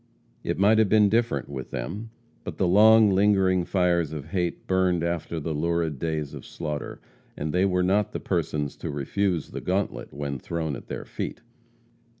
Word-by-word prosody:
It - - -2
might 105 +3 +4
have 110 -3 +3
been 105 -1 +5
different 115 +2 +1
with 65 -2 -6
them. 100 - -5 0.3
But - - -6
the 95 - +2
long, 110 +3 +7
lingering 95 -2 +3
fires 85 -5 +1
of 75 -1 -6
hate 90 -2 -2
burned 90 -2 +2
after 85 -1 -2
the 80 +1 -3
lurid 80 -1 -1
days 75 -2 -2
of - - -8
slaughter, 75 -2 -5 0.4
and 75 +1 -3
they 90 +2 +3
were 90 -1 +1
not 100 +3 +2
the - - -4
persons 75 -2 -2
to - - -5
refuse 80 +4 -1
the - - -5
gauntlet 95 +2 -2
when 70 -1 -4
thrown 80 0 -3
at - - -11
their - - -6
feet. - - -5
90 Hz, 175 wpm, -26 LUFS, 75-100 Hz, 0.4 s, long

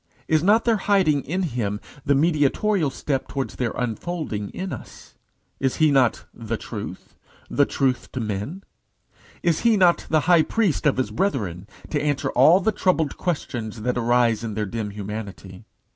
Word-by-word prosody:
Is 155 -1 +3
not 210 +6 +4
their 230 -2 +3
hiding 190 -8 +2
in 180 +7 -1
him 115 - -2 0.3
the 140 - +3
mediatorial 155 +4 +2
step 135 0 -3
towards 135 -1 -4
their 125 -2 0
unfolding 120 - -3
in 190 0 -5
us? - - -11 0.5
Is 130 -1 0
he 155 -2 +4
not 130 -4 +2
the 115 -1 -4
Truth? 105 -5 -8 0.4
the 145 - +3
Truth 130 -3 -1
to 130 - -3
men? 110 - -4 0.8
Is 170 -3 +2
he 230 -2 +3
not 180 -3 +3
the 155 -1 +3
High 170 0 +5
Priest 185 -5 +1
of 140 - +2
his 130 - -1
brethren, 100 - -2 0.2
to 145 - 0
answer 145 -2 0
all 175 +4 +6
the 220 +3 +1
troubled 180 -7 +1
questionings 120 - -3
that 125 +1 0
arise 120 -1 +2
in 110 -3 -4
their 105 -1 -1
dim 105 +1 -4
humanity? 100 -1 -7
135 Hz, 165 wpm, -23 LUFS, 110-175 Hz, 0.8 s, all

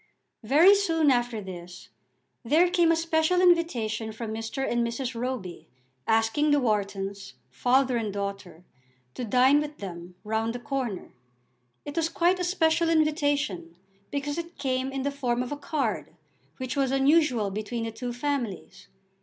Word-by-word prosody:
Very 305 - +6
soon 330 -7 +3
after 240 -3 0
this 180 -1 -10 0.5
there 320 +9 +3
came 345 -2 +4
a - - +4
special 330 +1 +1
invitation 245 -12 +2
from 220 0 -6
Mr. 225 +4 -3
and 240 0 +1
Mrs. 235 +2 -3
Roby, 230 -7 -5 0.4
asking 225 +7 +2
the 290 0 +4
Whartons, 200 - -2 0.2
father 255 - +2
and 220 -3 -2
daughter, 200 -4 -6 0.5
to - - -5
dine 255 +5 +4
with 300 0 -6
them 180 -2 -8
round 220 +2 -1
the - - -4
corner. 250 -7 -4 0.7
It 290 - -7
was 330 -1 +1
quite 350 +2 +2
a - - -1
special 335 -2 +2
invitation, 290 - 0 0.3
because 290 +2 -3
it 340 +1 -8
came 260 -1 -1
in 270 -1 -3
the 280 - -1
form 250 -3 -1
of 250 - -7
a - - -1
card, 290 0 -3 0.4
which 255 +1 -4
was 275 -2 +1
unusual 270 -6 +3
between 215 +3 -4
the 225 - -3
two 245 +2 -5
families. 245 -5 -4
255 Hz, 155 wpm, -27 LUFS, 220-300 Hz, 0.7 s, Very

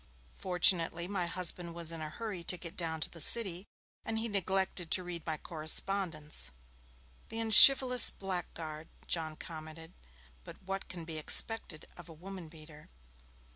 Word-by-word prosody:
Fortunately 175 -2 0
my 185 -3 -3
husband 175 -1 -2
was 170 -1 +1
in 165 -1 -8
a 155 - -6
hurry 205 0 -7
to 180 - +1
get 170 -1 -10
down 160 -2 -4
to - - -4
the 165 - -8
City, 190 0 +2 0.4
and 225 - -5
he 225 +1 -2
neglected 190 -3 -2
to 185 - +1
read 175 -2 -7
my 160 -1 -3
correspondence. 155 - -3 0.8
(The 225 - -7
unchivalrous 250 +3 +8
blackguard,' 165 -5 -7 0.2
John 160 -2 -2
commented. 160 +1 -11 0.5
'But - - -13
what 195 +1 -6
can 170 -3 -8
be 160 -1 -5
expected 175 0 +3
of 175 0 -13
a - - -11
woman 180 +1 -11
beater?') 155 -1 -16
170 Hz, 150 wpm, -31 LUFS, 160-195 Hz, 0.8 s, unchivalrous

